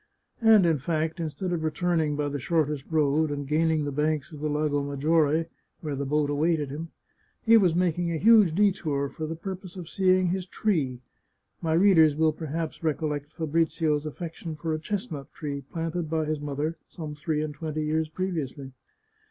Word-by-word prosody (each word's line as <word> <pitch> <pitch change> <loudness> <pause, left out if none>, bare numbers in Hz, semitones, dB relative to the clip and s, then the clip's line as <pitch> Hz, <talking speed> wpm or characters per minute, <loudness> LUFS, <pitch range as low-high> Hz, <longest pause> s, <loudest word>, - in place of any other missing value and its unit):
And, 220 -4 +6
in 160 -4 +2
fact, 160 +3 -1
instead 165 +3 -3
of 165 -2 -2
returning 160 -1 0
by 145 0 -1
the 145 0 -3
shortest 150 -1 0
road, 155 -1 +2
and 145 -1 -4
gaining 155 +1 +2
the 145 - -2
banks 150 +1 -1
of 150 - -8
the 150 +1 -1
Lago 150 -1 0
Maggiore, 150 +3 +2 0.4
where 150 -3 -3
the 140 0 -3
boat 150 0 +1
awaited 150 -1 +1
him, 160 +3 -6 0.5
he 230 0 +6
was 185 -7 +4
making 175 -1 +1
a 165 - -1
huge 210 -3 +6
detour 170 -9 +1
for 155 +2 -5
the 165 - -4
pur 190 +4 -5
pose 185 0 -12
of 175 -3 -7
seeing 185 0 +3
his 185 +1 -2
tree 145 - -1 0.3
— - - -48
my 160 -1 0
readers 165 -4 +5
will 160 0 +3
perhaps 160 +1 -4
recollect 150 -2 -2
Fabrizio's 160 -1 0
affection 165 +1 -6
for 160 +1 -3
a 155 - -2
chestnut 155 -5 -5
tree 145 -3 -4
planted 165 0 -3
by 160 -1 0
his 155 0 -2
mother 150 +3 -3
some 155 -3 -7
three 150 +1 -2
and 155 -1 -4
twenty 155 0 -4
years 155 +1 0
previously. 155 -6 -4
155 Hz, 185 wpm, -27 LUFS, 150-170 Hz, 0.5 s, And